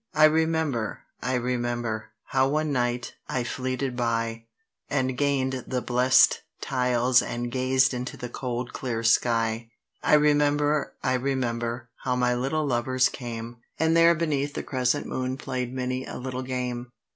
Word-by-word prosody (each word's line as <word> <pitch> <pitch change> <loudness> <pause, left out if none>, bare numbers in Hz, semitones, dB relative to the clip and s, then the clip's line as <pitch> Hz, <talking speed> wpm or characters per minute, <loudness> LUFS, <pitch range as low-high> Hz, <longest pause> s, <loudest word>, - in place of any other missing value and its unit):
"I 155 - +5
remember, 155 -7 +2 0.2
I 130 - 0
remember," 120 -3 -2 0.2
how 130 0 +3
one 155 +1 0
night 120 -2 -1 0.2
I 125 - 0
"fleeted 130 +1 -2
by," 115 -1 -1 0.4
And 130 -2 0
gain'd 130 -2 0
the 125 -2 -2
blessed 130 +1 +4 0.2
tiles 125 -1 +2
and 120 0 -4
gazed 130 +2 +2
into 125 +1 -4
the 125 - -5
cold 125 0 -4
clear 115 -3 -3
sky. 115 -1 +2 0.3
"I - - +5
remember, 150 0 +2
I 130 - +2
remember, 120 -2 -2
how 125 - -1
my 125 0 +2
little 135 +5 0
lovers 130 0 +2
came;" 120 -1 -6 0.2
And 160 +1 +2
there, 165 0 +6
beneath 145 -3 -1
the - - -3
crescent 125 -2 0
moon, 130 0 -3
play'd 130 -2 -3
many 130 0 -2
a - - -6
little 130 0 -4
game. 125 -1 -3
125 Hz, 145 wpm, -26 LUFS, 120-135 Hz, 0.4 s, there